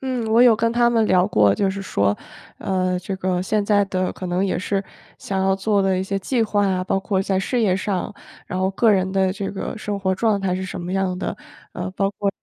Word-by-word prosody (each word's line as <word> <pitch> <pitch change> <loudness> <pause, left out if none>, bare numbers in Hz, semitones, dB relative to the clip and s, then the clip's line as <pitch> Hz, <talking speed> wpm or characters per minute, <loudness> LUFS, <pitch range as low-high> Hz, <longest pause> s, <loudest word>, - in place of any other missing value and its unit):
嗯， 255 -3 -2
我 230 +2 +6
有 235 -3 +6
跟 230 +1 +1
他 240 0 +3
们 225 -2 +2
聊 180 0 +3
过， 105 - +4
就 195 - +1
是 195 +1 -5
说， 100 - 0 0.4
呃， 185 -1 0
这 185 +2 -5
个 185 -1 -1
现 210 +2 0
在 205 -1 +3
的 185 -1 -2
可 185 - -7
能 180 +2 0
也 185 -3 -1
是 195 +2 -1 0.4
想 195 -1 -3
要 190 0 +2
做 200 +1 +1
的 190 -1 +2
一 185 - 0
些 195 +1 -2
计 235 +5 0
划 205 -2 +1
啊， 185 -1 0
包 190 +1 0
括 195 0 -1
在 195 -1 0
事 240 +6 -1
业 195 -5 +2
上， 195 +1 -2 0.3
然 185 - -4
后 185 0 +1
个 225 +3 +3
人 190 -2 +2
的 190 -1 +2
这 195 0 -4
个 195 - -5
生 205 -1 -4
活 190 -1 +1
状 210 0 +1
态 190 -2 0
是 190 - -4
什 185 0 -6
么 175 +1 -5
样 190 -1 0
的， 180 - -4 0.4
呃， 180 +1 -4
包 195 +1 0
括 200 +1 -2
195 Hz, 265 characters per minute, -22 LUFS, 185-205 Hz, 0.4 s, 我